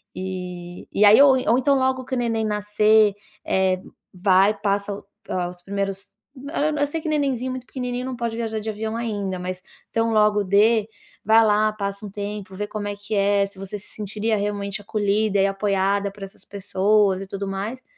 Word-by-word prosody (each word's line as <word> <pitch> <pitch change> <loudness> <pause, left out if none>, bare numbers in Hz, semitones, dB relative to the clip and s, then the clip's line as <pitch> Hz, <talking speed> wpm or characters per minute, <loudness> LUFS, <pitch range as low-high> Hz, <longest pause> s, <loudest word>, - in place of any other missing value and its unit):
E 180 -1 -6
e - - -2
aí 210 +5 +8
ou 285 -1 +8 0.2
ou 240 - +5
então, 275 +2 +3
logo 260 0 0
que 260 - -3
o - - -1
neném 225 -1 0
nascer, 210 0 +3 0.3
eh, 190 -1 +2 0.3
vai, 190 +2 +4
passa 200 0 0 0.4
,hã, 180 -1 -1
os 180 0 -12
primeiros 195 0 -2 0.8
eu 290 - +3
sei 325 +2 -4
que 310 - -3
nenenzinho 270 -4 0
muito 255 -1 -6
pequenininho 250 -1 -4
não 260 - -4
pode 235 -1 -3
viajar 220 -2 -2
de 220 - -4
avião 220 +1 -3
ainda, 205 -5 -3
mas 180 0 -5 0.3
tão 225 0 +1
logo 210 -1 +3
dê, 210 +3 +3 0.4
vai 220 +2 +6
lá, 215 0 +3
passa 200 0 -4
um - - -6
tempo, 200 -2 -6
vê 210 - -3
como 205 -1 -5
é 205 - -3
que 205 +2 -8
é, 200 0 +3
se 195 -1 -12
você 195 +2 -5
se - - -11
sentiria 215 +1 -1
realmente 200 0 -3
acolhida 205 0 0
e 195 - +4
apoiada 195 0 0
por 200 0 -11
essas 195 +2 -11
pessoas 200 0 +1
e 195 - -7
tudo 200 +1 -4
mais, 205 +7 -4
205 Hz, 190 wpm, -23 LUFS, 195-220 Hz, 0.8 s, aí